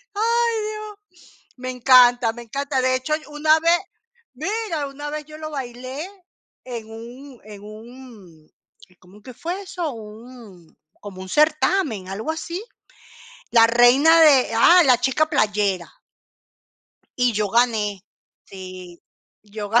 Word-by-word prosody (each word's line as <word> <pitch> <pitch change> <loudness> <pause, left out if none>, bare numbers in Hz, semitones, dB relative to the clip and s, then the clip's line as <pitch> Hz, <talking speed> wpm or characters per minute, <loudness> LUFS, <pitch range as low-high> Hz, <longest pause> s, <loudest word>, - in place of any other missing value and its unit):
Ay, 465 +2 +1
dios. 420 -4 -11 0.4
Me 255 0 -6
encanta, 245 -2 +5
me 240 +1 -10
encanta. 275 +3 -3
De 255 0 +1
hecho 260 +4 -1
y 310 - -15
una 310 +1 +2
vez, 335 +2 +3 0.5
¡mira!, 330 - -3
una 290 +2 -8
vez 300 0 -6
yo 305 +1 -12
lo 310 0 -7
bailé 260 +3 -6 0.6
en 235 -3 -7
un 245 +4 -12
en 210 -2 -12
un 215 -7 -14 0.5
¿cómo 185 +3 -19
es 210 - -20
que 255 - -11
fue 350 - -5
eso? 355 -5 -5
Un, 220 -5 -13 0.3
como 195 -2 -10
un 190 - -9
certamen, 300 - +1
algo 215 +11 -4
así, 340 +5 -6 0.9
la 230 -1 +6
reina 255 +8 +5
de 280 -5 +5
ah, 345 +10 +6
la 250 -2 +4
chica 270 +5 +1
playera. 205 - -1 1.2
Y 245 -1 +2
yo 210 -2 -2
gané, 215 -5 0 0.4
sí, 185 -2 -11 0.4
yo 205 0 -8
ga 230 +3 +4
250 Hz, 135 wpm, -21 LUFS, 215-310 Hz, 1.2 s, la